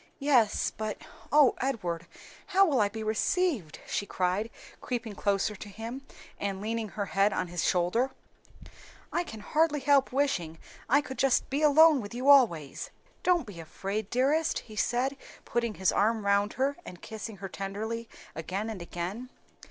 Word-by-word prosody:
"Yes, 260 -7 +3
but 215 -1 -3 0.3
O 290 -4 +6
Edward, 180 -11 -2 0.4
how 390 0 +5
will 280 - +2
I 205 - +3
be 220 +1 -6
received?" 220 - 0
she 200 - -2
cried, 185 +5 0 0.3
creeping 240 -3 -3
closer 200 +1 0
to 205 +1 -9
him 230 +7 -7 0.3
and 195 -1 -2
leaning 220 +1 -3
her 200 +1 -3
head 195 +1 +2
on 175 - -2
his 175 -1 -2
shoulder. 180 +9 +2 1.0
"I - - +1
can 220 -10 -9
hardly 300 +5 +2
help 280 0 +3
wishing 220 - 0 0.3
I 285 +4 +5
could 265 -3 -8
just 270 -2 +3
be 280 +3 0
alone 305 -1 +6
with 205 +2 -8
you 255 +3 0
always." 190 - +4 0.3
"Don't 355 -5 +2
be 200 -6 -10
afraid, 195 +6 -4
dearest," 285 +6 +2
he 215 - -11
said, 250 +5 0 0.3
putting 235 -2 -1
his 190 -1 +2
arm 215 +1 +1
round 200 +1 +2
her 275 +2 0
and 180 - -10
kissing 220 -1 -7
her 195 - -6
tenderly 215 +5 -5 0.3
again 190 +7 -3
and 200 -5 -7
again. 180 +8 -5
220 Hz, 160 wpm, -29 LUFS, 195-270 Hz, 1.0 s, O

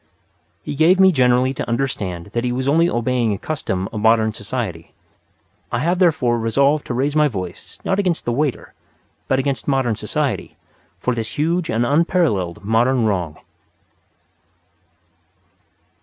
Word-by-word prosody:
He - - -4
gave 165 +6 +4
me 190 0 +7
generally 130 -2 +3
to 125 - -5
understand 100 -8 -3
that 120 - -1
he 125 - 0
was 130 +2 -2
only 165 +4 +3
obeying 120 -3 0
a - - -6
custom 95 -9 -3
of 105 - -3
Modern 110 0 +3
Society. 105 -7 -5 0.8
I - - 0
have 175 +3 0
therefore 145 -10 +2
resolved 140 +6 +1
to 120 - -3
raise 140 +4 0
my 150 -1 +4
voice, 95 -8 -7
not 195 - +1
against 180 -4 0
the 120 - 0
waiter, 140 +2 -2 0.5
but 130 - +2
against 135 0 -2
Modern 135 -5 +1
Society, - - -3 0.4
for 125 - 0
this 115 -1 -5
huge 165 +3 0
and 115 +2 +1
unparalleled 120 - +1
modern 120 +3 +2
wrong. 90 -7 -1
125 Hz, 145 wpm, -20 LUFS, 110-150 Hz, 0.8 s, me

